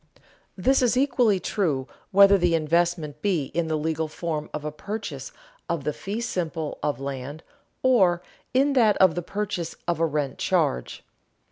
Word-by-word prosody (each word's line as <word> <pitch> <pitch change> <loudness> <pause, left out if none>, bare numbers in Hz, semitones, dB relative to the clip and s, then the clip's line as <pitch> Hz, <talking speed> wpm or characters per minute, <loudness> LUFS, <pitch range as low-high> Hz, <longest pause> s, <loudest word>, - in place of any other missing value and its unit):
This 265 +9 +3
is 250 0 +2
equally 245 -7 +3
true 155 -9 -1 0.2
whether 200 +1 +7
the 175 -3 +2
investment 165 -1 0
be 170 -8 0
in 170 -1 0
the 160 - 0
legal 160 +1 -1
form 155 -1 -4
of 150 0 -5
a 150 - -2
purchase 155 -5 -6 0.4
of 170 -4 -1
the 150 - -1
fee 205 +8 -4
simple 165 -8 -3
of 145 -4 -1
land, 140 +3 -6 0.4
or 190 -9 +4 0.3
in 275 +2 +3
that 225 -6 +4
of 185 -3 +5
the 175 - -2
purchase 190 -2 -4
of 175 -2 0
a 165 - +3
rent 145 -3 -2
charge. 60 - 0
170 Hz, 160 wpm, -25 LUFS, 150-200 Hz, 0.4 s, whether